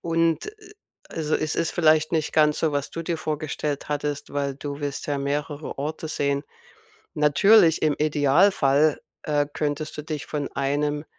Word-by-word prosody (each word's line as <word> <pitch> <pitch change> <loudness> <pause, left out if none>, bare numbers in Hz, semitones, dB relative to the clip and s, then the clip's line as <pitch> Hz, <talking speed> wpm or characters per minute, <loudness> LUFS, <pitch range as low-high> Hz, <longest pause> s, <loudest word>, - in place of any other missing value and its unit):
Und, 165 - 0
äh - - -5 0.2
äh 415 - -15 0.4
also, 155 -1 -2
es 155 0 -1
ist 165 - 0
vielleicht 155 -1 +3
nicht 160 -2 0
ganz 150 -1 +3
so, 155 -2 +1
was 140 -1 -2
du 165 - -5
dir 165 -1 -3
vorgestellt 150 -2 -3
hattest, 145 0 -3
weil 140 -1 -1
du 145 +1 -6
willst 145 -1 -4
ja 145 -1 -1
mehrere 145 +1 -3
Orte 155 +2 -4
sehen. 140 -2 -1 0.7
Natürlich 160 +4 +5
im 155 -2 +3
Idealfall, 150 0 +3 0.2
äh, 145 -1 +1
könntest 150 0 -3
du 150 - -5
dich 155 -1 -5
von 145 -2 -3
einem 145 +2 -1
150 Hz, 165 wpm, -24 LUFS, 145-160 Hz, 0.7 s, Natürlich